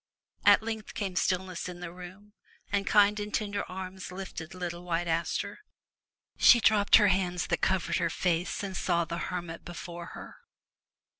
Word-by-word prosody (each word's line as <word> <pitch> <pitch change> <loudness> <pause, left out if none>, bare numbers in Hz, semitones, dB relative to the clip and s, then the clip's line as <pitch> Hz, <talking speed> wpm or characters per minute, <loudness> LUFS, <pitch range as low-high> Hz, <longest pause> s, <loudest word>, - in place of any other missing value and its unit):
At - - +7
length 220 -1 -5
came 195 -3 -3
stillness 185 -1 -1
in 175 -1 -8
the 175 -1 -6
room, 185 +3 -12 0.4
and 200 -1 0
kind 210 0 +5
and 210 0 -4
tender 205 -1 -1
arms 185 0 -7
lifted 180 -3 -7
little 175 -1 -5
White 175 -1 -1
Aster. 165 - -1 0.8
She 235 - +8
dropped 210 -2 +5
her 205 -2 +6
hands 180 -2 0
that 175 -4 -1
covered 190 -2 +1
her 170 - +1
face 175 +3 -1
and 195 -1 -4
saw 170 -3 +1
the 170 +1 -4
hermit 175 -2 -5
before 170 -1 -8
her. - - -10
185 Hz, 160 wpm, -29 LUFS, 175-200 Hz, 0.8 s, She